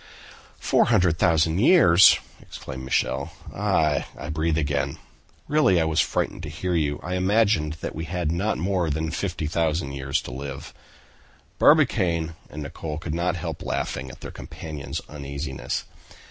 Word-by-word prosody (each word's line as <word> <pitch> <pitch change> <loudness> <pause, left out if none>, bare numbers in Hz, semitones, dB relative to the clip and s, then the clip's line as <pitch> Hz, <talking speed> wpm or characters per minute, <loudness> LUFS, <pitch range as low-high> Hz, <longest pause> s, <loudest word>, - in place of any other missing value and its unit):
"Four - - +3
hundred 90 -8 +3
thousand 80 0 +3
years!" 100 - +7 0.2
exclaimed 65 0 -8
Michel. 70 +4 -1 0.2
"Ah! 80 -8 +1
I 75 - -7
breathe 80 +1 0
again. 70 -3 -1 0.5
Really 145 - +4
I - - +3
was 80 -1 +1
frightened - - 0
to 80 - -6
hear 90 +4 -3
you; 75 -4 0
I 90 - -4
imagined 95 -4 +2
that - - -4
we 80 +2 -5
had 85 -1 -2
not 95 +6 0
more 90 0 0
than 80 +2 -2
50,000 80 -4 -1
years 70 +2 -1
to - - -7
live." 70 +1 -7 0.9
Barbicane 90 - +3 0.2
and 75 0 -6
Nicholl 75 +2 -5
could 80 -1 -5
not 90 +2 0
help 85 - -5
laughing 65 +1 -3
at - - -12
their - - -7
companion's 75 -4 -7
uneasiness. 70 -1 -4
80 Hz, 145 wpm, -24 LUFS, 75-90 Hz, 0.9 s, years